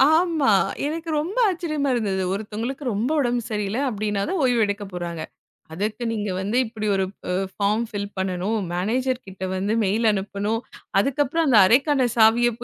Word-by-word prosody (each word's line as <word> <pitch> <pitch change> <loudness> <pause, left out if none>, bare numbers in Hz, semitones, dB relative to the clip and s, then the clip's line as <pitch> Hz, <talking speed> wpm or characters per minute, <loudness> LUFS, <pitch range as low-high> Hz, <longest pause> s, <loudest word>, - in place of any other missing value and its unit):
ஆமா. 320 -7 +2 0.4
எனக்கு 325 +2 -4
ரொம்ப 360 +10 -4
ஆச்சரியமா 310 -6 -1
இருந்தது. 195 -5 -1
ஒருத்தவுங்களுக்கு 220 +7 -4
ரொம்ப 225 +7 -1
உடம்பு 240 -3 0
சரியில்ல 210 +2 -1
அப்படின்னா 210 -2 -2
தான் 370 -3 0
ஓய்வு 245 -3 +3
எடுக்கப்போறாங்க. 180 -5 -4 0.5
அதுக்கு 210 +7 -3
நீங்க 210 -3 -2
வந்து 205 +5 -2
இப்படி 220 -1 -5
ஒரு 190 - +1 0.3
ஒரு - - 0 0.3
பார்ம் 210 +3 +2
ஃபில் 205 -2 -4
பண்ணனும். 190 +3 -1 0.2
மேனேஜர் 250 +8 -1
கிட்ட 190 -1 -11
வந்து 200 +3 -1
மெயில் 220 +4 +2
அனுப்பணும். 205 +3 -2 0.4
அதுக்கப்புறம் 290 +6 +1
அந்த 240 -6 +6
அறைக்கான 265 +4 +3
சாவிய 230 +2 +5
220 Hz, 145 wpm, -23 LUFS, 200-260 Hz, 0.5 s, அந்த